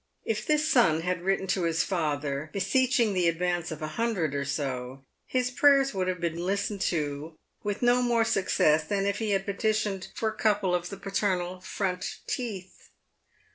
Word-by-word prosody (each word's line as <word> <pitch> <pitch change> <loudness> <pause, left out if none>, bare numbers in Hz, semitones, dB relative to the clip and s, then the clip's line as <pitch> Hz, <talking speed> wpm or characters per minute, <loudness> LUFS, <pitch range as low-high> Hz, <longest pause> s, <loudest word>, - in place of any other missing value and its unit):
If 220 -1 -2
this 305 0 +2
son 185 - +4
had 180 0 -2
written 195 +1 0
to 190 -2 +1
his 165 -1 +1
father, 150 -4 -2
beseeching 240 +2 +2
the 180 -2 +2
advance 175 0 0
of 160 -1 -6
a - - -1
hundred 190 -11 0
or 140 0 -1
so, 135 -2 -4 0.2
his 250 -1 0
prayers 275 +1 +4
would 185 -2 -1
have 185 -1 -1
been 170 0 -2
listened 200 +1 -1
to 155 -1 -3 0.2
with 205 +3 -3
no 245 +1 +4
more 235 -2 +2
success 175 -7 +2
than 195 +1 -1
if 200 0 0
he 220 -2 -1
had 195 -1 +1
petitioned 205 -1 -1
for 220 - 0
a 215 - -7
couple 205 -4 +1
of 175 0 -1
the 195 - -7
paternal 185 -2 -1
front 185 -1 -3
teeth. 200 -7 -5
190 Hz, 175 wpm, -28 LUFS, 165-215 Hz, 0.2 s, son